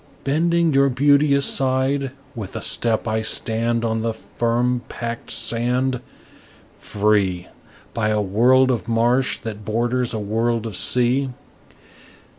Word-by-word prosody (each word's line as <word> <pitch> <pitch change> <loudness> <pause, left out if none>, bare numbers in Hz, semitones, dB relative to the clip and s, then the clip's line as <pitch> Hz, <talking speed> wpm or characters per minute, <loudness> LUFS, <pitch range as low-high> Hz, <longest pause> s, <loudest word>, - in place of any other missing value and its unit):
Bending 165 +3 +1
your 140 0 +4
beauty 140 +2 +3
aside, 135 0 +1 0.2
with 105 -7 -8
a - - -4
step 115 0 0
I 110 0 0
stand 115 +1 -1
On 110 0 -1
the 115 0 -1
firm 120 +2 -1
packed 115 0 -6
sand, 125 +2 0 0.7
Free 100 -4 0 0.5
By 110 -2 0
a 105 0 +1
world 125 +6 +3
of 115 -2 -3
marsh 120 +3 +1
that 110 -2 -7
borders 120 +3 -1
a 115 - -2
world 115 +2 -1
of 110 -4 -5
sea. 125 +7 +2
120 Hz, 125 wpm, -21 LUFS, 110-130 Hz, 0.7 s, your